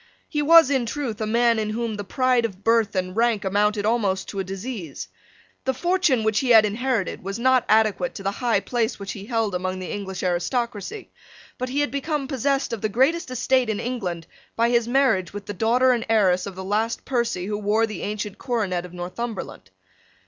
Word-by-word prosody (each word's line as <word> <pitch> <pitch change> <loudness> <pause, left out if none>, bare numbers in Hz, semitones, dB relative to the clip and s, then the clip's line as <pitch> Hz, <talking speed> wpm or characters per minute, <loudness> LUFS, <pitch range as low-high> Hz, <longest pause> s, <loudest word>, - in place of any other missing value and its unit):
He 295 - -1
was 325 -1 +7
in 260 -4 +1
truth 235 -5 -4
a 215 - -1
man 235 0 +3
in 215 -1 -1
whom 230 +1 -2
the 205 -1 -5
pride 255 +3 +1
of 200 -4 -4
birth 225 -2 +2
and 185 0 -2
rank 230 -3 +1
amounted 205 +2 +1
almost 205 -4 0
to 200 - -5
a - - 0
disease. 185 - -6 0.6
The 265 0 -1
fortune 345 -5 +2
which 220 -1 +2
he 260 - -1
had 220 -3 +7
inherited 225 -2 -1
was 195 +2 -4
not 255 +1 +3
adequate 220 +3 +2
to 195 - -7
the 195 - 0
high 240 +2 0
place 240 -1 -1
which 200 -1 -6
he 200 -1 -8
held 225 -4 0
among 185 +1 -2
the 185 -1 -6
English 190 -2 -5
aristocracy: 235 - -2 0.5
but 255 0 -2
he 280 +3 0
had 290 - 0
become 280 0 -2
possessed 275 -1 0
of 225 - -4
the 215 - 0
greatest 270 +8 +1
estate 255 -1 +1
in 215 - -1
England 185 -10 -3 0.3
by 230 +1 +2
his 235 -1 +2
marriage 240 -9 +2
with 205 -1 -7
the 205 - -5
daughter 240 +6 +3
and 240 -2 0
heiress 195 -4 +3
of 195 - -7
the 190 - -6
last 215 +4 -1
Percy 235 -8 -1
who 205 +1 -3
wore 210 +2 +2
the 215 -1 -7
ancient 210 -1 -4
coronet 195 -8 -1
of 175 - -17
Northumberland. 180 - -6
225 Hz, 205 wpm, -23 LUFS, 195-250 Hz, 0.6 s, was